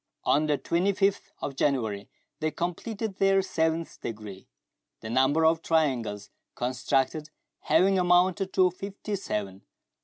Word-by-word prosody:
On 150 Hz, +2 st, +2 dB
the 150 Hz, -1 st, +2 dB
25th 195 Hz, +5 st, 0 dB
of 140 Hz, -, -3 dB
January 110 Hz, -8 st, -1 dB, 0.3 s
they 155 Hz, -, 0 dB
completed 195 Hz, +6 st, -4 dB
their 195 Hz, 0 st, +3 dB
seventh 160 Hz, -2 st, -1 dB
degree, 105 Hz, -4 st, -7 dB, 0.5 s
the 110 Hz, -, -6 dB
number 135 Hz, +6 st, +3 dB
of 160 Hz, 0 st, +3 dB
triangles 120 Hz, -12 st, 0 dB, 0.2 s
constructed 135 Hz, +4 st, -1 dB, 0.3 s
having 185 Hz, +5 st, +3 dB
amounted 180 Hz, +2 st, +3 dB
to 185 Hz, -1 st, +4 dB
fifty 200 Hz, +3 st, -5 dB
seven. 100 Hz, -, -4 dB
160 Hz, 120 wpm, -27 LUFS, 130-185 Hz, 0.5 s, to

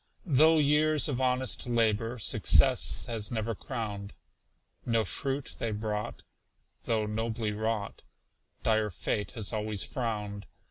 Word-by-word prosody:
Though 160 Hz, 0 st, +5 dB
years 150 Hz, +1 st, +3 dB
of 130 Hz, -3 st, -2 dB
honest 130 Hz, 0 st, 0 dB
labor 115 Hz, 0 st, +1 dB
Success 110 Hz, -, +3 dB
has 115 Hz, -3 st, -3 dB
never 115 Hz, -1 st, -2 dB
crowned, 105 Hz, -3 st, -5 dB, 0.7 s
No 115 Hz, -2 st, +1 dB
fruit 135 Hz, +7 st, -3 dB
they 115 Hz, -, -1 dB
brought, 105 Hz, 0 st, -3 dB, 0.6 s
though 110 Hz, -2 st, +1 dB
nobly 110 Hz, +1 st, -2 dB
wrought, 110 Hz, 0 st, -2 dB, 0.6 s
Dire 110 Hz, -1 st, +2 dB
Fate 105 Hz, +2 st, -2 dB
has 110 Hz, -1 st, -3 dB
always 105 Hz, -2 st, -2 dB
frowned. 105 Hz, -5 st, -4 dB
115 Hz, 120 wpm, -30 LUFS, 105-125 Hz, 0.7 s, Though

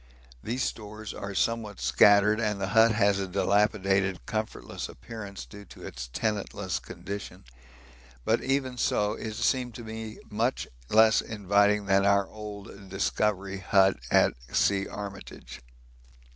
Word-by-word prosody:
These 125 Hz, +3 st, -2 dB
stores 105 Hz, -1 st, -5 dB
are 100 Hz, 0 st, -6 dB
somewhat 110 Hz, -2 st, -1 dB
scattered, 105 Hz, +1 st, +5 dB
and 105 Hz, -3 st, -1 dB
the 95 Hz, -1 st, -2 dB
hut 115 Hz, +1 st, +5 dB
has 100 Hz, -2 st, +2 dB
a 95 Hz, -, -2 dB
dilapidated, 95 Hz, -1 st, +1 dB
comfortless 110 Hz, 0 st, -4 dB
appearance 105 Hz, -4 st, -8 dB
due 105 Hz, -1 st, -12 dB
to -, -, -12 dB
its -, -, -7 dB
tenantless 100 Hz, -, -2 dB
condition; 100 Hz, -9 st, -8 dB, 0.8 s
but -, -, +2 dB
even 130 Hz, -2 st, -1 dB
so 105 Hz, -1 st, +1 dB
it 110 Hz, -1 st, -6 dB
seemed 125 Hz, 0 st, 0 dB
to 120 Hz, -, -8 dB
me 110 Hz, 0 st, -7 dB
much 115 Hz, +5 st, -1 dB, 0.2 s
less 110 Hz, 0 st, +5 dB
inviting 105 Hz, 0 st, +2 dB
than 95 Hz, 0 st, +3 dB
our 100 Hz, -1 st, +3 dB
old 100 Hz, -2 st, -9 dB
Discovery 100 Hz, 0 st, -1 dB
hut 95 Hz, 0 st, +3 dB
at -, -, +4 dB, 0.2 s
C. 100 Hz, 0 st, +2 dB
Armitage. 100 Hz, -9 st, -8 dB
105 Hz, 130 wpm, -28 LUFS, 100-110 Hz, 0.8 s, scattered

